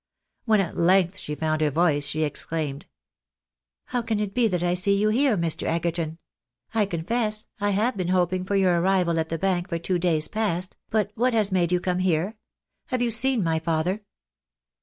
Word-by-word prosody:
When 220 -3 +4
at 175 - -4
length 185 +1 +3
she 150 - -5
found 155 0 -1
her 155 - +3
voice, 145 -2 +2
she 155 +2 0
exclaimed 150 -1 -3 0.3
— - - -68
" 65 +1 -66
How 245 - 0
can 225 -2 -2
it 205 -2 -2
be 245 -2 +3
that 180 -4 -1
I 175 0 +2
see 200 +2 +3
you 215 +1 +2
here, 245 0 +2
Mr. 170 -2 0
Egerton? 165 -1 -1 0.6
I 215 -3 +2
confess, 215 +5 -1
I 205 -1 +1
have 210 +4 +1
been 180 -2 -2
hoping 185 0 +1
for 200 +2 -2
your 180 -3 +3
arrival 180 -3 +2
at 160 - -2
the 165 - -2
Bank 180 0 0
for 170 - -1
two 175 +2 -1
days 165 -3 +1
past, 195 -5 -2
but 215 -2 0
what 245 +2 +1
has 210 -3 +2
made 175 -2 +1
you 180 - +3
come 180 0 -1
here? 185 +3 0 0.5
Have 255 -2 -1
you 235 - 0
seen 235 0 +2
my 160 -1 +1
father? 165 +5 -1
180 Hz, 200 wpm, -25 LUFS, 165-210 Hz, 0.6 s, When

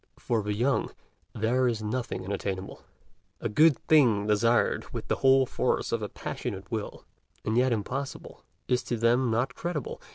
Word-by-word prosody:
For 115 -2 -1
the 105 0 -2
young, 125 +5 +1 0.5
there 125 +4 +2
is 115 -3 -1
nothing 115 -2 -3
unattainable; 95 -1 -4 0.6
a - - -2
good 150 +6 +5
thing 120 -10 +4
desired 115 +3 +2
with - - -6
the - - +1
whole 135 0 +5
force - - -1
of - - 0
a - - -3
passionate 95 0 -6
will, 110 -3 -5 0.4
and 110 - 0
yet 125 +1 +3
impossible, 130 +5 -4 0.2
is 125 0 +2
to 120 - -2
them 120 +2 +3
not 120 +3 0
credible. 165 -4 -4
115 Hz, 160 wpm, -28 LUFS, 105-130 Hz, 0.6 s, good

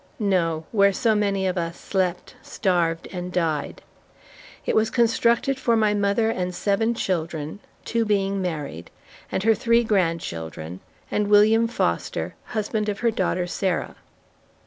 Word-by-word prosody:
No! 170 -7 0
Where 200 -2 +4
so 225 +3 +2
many 200 -2 +1
of 185 -1 0
us 170 0 -4
slept, 185 -2 -2
starved, 170 -4 0
and 180 -1 -5
died! 165 -5 -1 0.8
It - - 0
was 220 0 +3
constructed 235 +3 +2
for 235 -3 +2
my 215 -1 +3
mother 205 +2 +1
and 180 -3 -3
seven 220 +5 +1
children 165 -4 -3 0.3
(two 230 0 +1
being 200 -2 0
married) 150 - -4 0.4
and 190 - -1
her 225 +1 +5
three 235 +2 +3
grandchildren, 95 - -2 0.3
and 210 -1 +1
William 215 +2 +5
Foster, 235 - -1
husband 215 -1 -2
of 205 +1 -4
her 235 -1 +3
daughter 185 -5 0
Sarah. 180 0 -2
200 Hz, 140 wpm, -24 LUFS, 175-220 Hz, 0.8 s, her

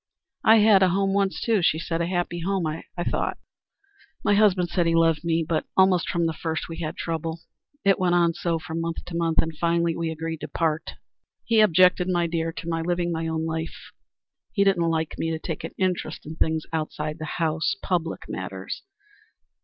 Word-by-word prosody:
"I 220 - +7
had 210 -3 +6
a 190 - +5
home 195 +2 +1
once, 195 -1 +1
too," 225 -4 +1
she 160 - +3
said, 165 +1 -2
"a 170 - 0
happy 175 -1 -1
home, 190 0 -1
I 155 +1 -4 0.2
thought. - - -1 0.9
My - - +4
husband 195 -4 +4
said 175 -2 +1
he 165 - +2
loved 165 -1 +3
me. 165 -1 +1
But 165 -1 -1
almost 190 -2 +4
from 170 -1 +1
the 165 - 0
first 160 0 -3
we 165 - -7
had 155 -2 -4
trouble. 165 0 -3 0.4
It 195 -1 +4
went 180 -1 +2
on 170 -1 +3
so 165 0 -1
from 160 +1 -4
month 165 0 -4
to 175 - -7
month, 165 -1 +2
and 160 -1 -6
finally 170 -1 +1
we 165 -1 -2
agreed 160 0 -4
to - - -4
part. 160 -1 -1 0.5
He 230 -1 +3
objected, 180 -2 +5
my 175 -1 +2
dear, 165 0 -1
to 165 - -8
my 165 -1 -1
living 175 +1 -1
my 165 0 -2
own 160 0 -1
life. 160 0 -5 0.6
He 200 - +2
didn't 175 -4 +3
like 160 -1 -2
me 165 - 0
to 160 - -1
take 160 -1 -5
an - - -7
interest 185 -2 -2
in 155 +2 -7
things 160 -1 0
outside 155 0 -3
the 155 -1 -5
house 160 -3 0
public 170 -3 -1
matters. - - -5
165 Hz, 200 wpm, -25 LUFS, 160-180 Hz, 0.9 s, I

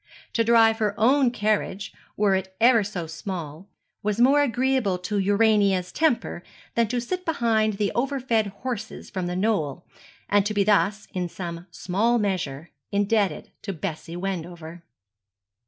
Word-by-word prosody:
To 230 - +2
drive 225 -1 +5
her 210 -2 -1
own 260 +3 +4
carriage, 210 -3 -1 0.2
were 205 -2 +3
it 190 0 -2
ever 230 -1 +5
so 195 -4 -4
small, 165 0 -6 0.3
was 210 +1 -1
more 275 +4 +5
agreeable 255 -6 +1
to 200 +3 -2
Urania's 200 -2 +3
temper 305 - 0 0.3
than 235 -1 +2
to 245 +3 -1
sit 365 +10 -3
behind 230 -9 +1
the 200 0 -1
over 270 +3 0
fed 230 -4 +1
horses 220 +2 -6
from 185 -3 -3
The 180 - -3
Knoll, 180 -6 -1 0.4
and 205 0 +3
to 215 - -3
be 200 - +3
thus, 205 +1 +2
in 180 -3 -2
some 170 0 -7
small 200 +8 0
measure, 175 -8 -2 0.2
indebted 205 0 0
to 200 - -4
Bessie 165 -1 -5
Wendover. 175 -3 -5
205 Hz, 150 wpm, -25 LUFS, 180-230 Hz, 0.4 s, drive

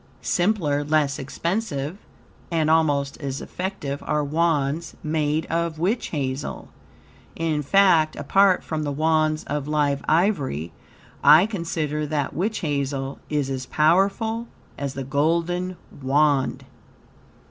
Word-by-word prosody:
Simpler, 175 -7 +1
less 145 -2 +1
expensive, 165 - -3 0.5
and 160 -2 +1
almost 145 -4 +2
as 140 -1 -3
effective, 180 -7 -4
are 150 0 +1
Wands 155 0 0
made 155 0 0
of 165 -1 -1
witch 195 +9 0
hazel. 135 -2 -4 0.7
In 160 -2 -1
fact, 165 -1 +4
apart 190 +6 +3
from 155 -1 -3
the 145 -1 -2
Wands 155 +1 +1
of 145 -1 -3
live 145 -2 +1
ivory, 145 - +1 0.5
I 160 +5 +8
consider 160 -7 -2
that 145 -2 -2
witch 210 +7 -1
hazel 140 -3 -2
is 150 -3 0
as 130 -1 -4
powerful 200 +8 +2 0.3
as 140 -1 -4
the 135 - -3
golden 170 +6 0 0.2
Wand. 140 0 +2
155 Hz, 115 wpm, -23 LUFS, 140-170 Hz, 0.7 s, I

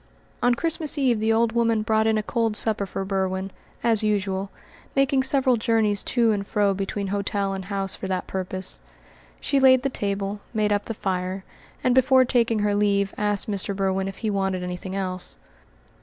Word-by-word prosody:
On 245 0 +3
Christmas 320 0 -1
Eve 255 -5 +2
the 220 +1 +1
old 225 0 +2
woman 230 -2 +1
brought 220 0 +2
in 220 0 +2
a 215 - -1
cold 225 -1 0
supper 210 -3 0
for 195 +1 -4
Berwin, 190 0 -2 0.3
as 230 -2 +4
usual, 200 -2 -1 0.5
making 275 0 +3
several 265 -2 +2
journeys 220 -3 +1
to 235 -3 +2
and 200 -1 -2
fro 205 -1 +2
between 195 +1 -3
hotel 200 0 -1
and 190 -1 -5
house 195 -1 -1
for 190 - -6
that 185 -1 -2
purpose. 185 0 -3 0.6
She 280 - +1
laid 260 -1 +6
the 275 - +1
table, 200 -3 -3 0.2
made 210 -1 +2
up 205 - -1
the 225 - -4
fire, 185 -1 -3 0.4
and 250 - +3
before 260 0 +5
taking 235 -3 +2
her 205 - +1
leave 200 -1 +1
asked 205 -1 0
Mr. 200 -1 -2
Berwin 190 0 0
if 195 - -7
he 215 - +1
wanted 195 -2 -1
anything 180 +1 -5
else. 185 - 0
205 Hz, 185 wpm, -24 LUFS, 195-230 Hz, 0.6 s, laid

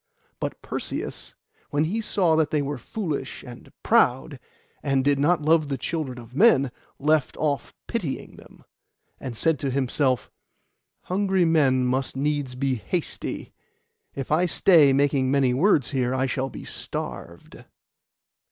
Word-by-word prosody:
But - - -4
Perseus, - - -5 0.3
when 145 +1 +1
he 200 +8 -1
saw 180 -6 +2
that 160 -2 +2
they 150 -2 0
were 140 -1 -4
foolish 155 - -4
and 120 -2 -12
proud, 65 -2 +2 0.4
and 135 -1 +1
did 145 -1 +3
not 155 +2 +2
love 155 0 +3
the 140 -1 -2
children 150 -6 -3
of 120 +1 -12
men, 140 - +5 0.3
left 150 -1 +1
off 145 -2 -1
pitying 185 - -4
them, - - -16 0.6
and 125 -4 -6
said 160 +1 +1
to 140 - -2
himself, 130 -1 0 0.7
'Hungry 190 -1 +1
men 135 -6 +3
must 130 +1 -1
needs 145 -2 -1
be 135 +1 0
hasty; 105 - -4 0.6
if 135 0 -5
I 175 +4 +3
stay 160 -4 +5
making 135 -1 +2
many 135 -2 +3
words 150 - +3
here, 130 -2 0
I 130 0 +1
shall 135 0 -2
be - - -9
starved. 85 0 -7
140 Hz, 145 wpm, -25 LUFS, 130-160 Hz, 0.7 s, men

